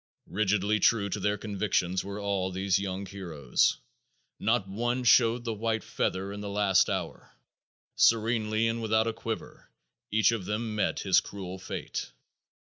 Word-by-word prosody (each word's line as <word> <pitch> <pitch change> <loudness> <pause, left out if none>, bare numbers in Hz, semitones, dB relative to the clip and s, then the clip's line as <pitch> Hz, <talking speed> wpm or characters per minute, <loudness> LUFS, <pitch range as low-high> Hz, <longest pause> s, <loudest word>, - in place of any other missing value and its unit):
Rigidly 105 +1 +1
true 100 0 +3
to 105 - -3
their 105 +1 0
convictions 95 -4 -1
were 100 +1 -6
all 100 -2 -1
these 95 +1 +1
young 100 0 -4
heroes. 85 -9 0 0.6
Not 110 -2 +1
one 120 +6 -1
showed 120 0 +5
the 115 -2 -2
white 110 +1 -1
feather 95 +2 -2
in 105 - -6
the 105 - -5
last 100 -2 +3
hour. - - -4 0.6
Serenely 110 -1 +3
and 115 0 -1
without 110 0 +2
a 115 - -1
quiver 115 0 -6 0.4
each 110 0 +4
of 110 -5 -3
them 110 +2 -2
met 105 - 0
his 95 -3 +4
cruel 95 -2 -7
fate. - - -5
105 Hz, 150 wpm, -28 LUFS, 95-110 Hz, 0.6 s, showed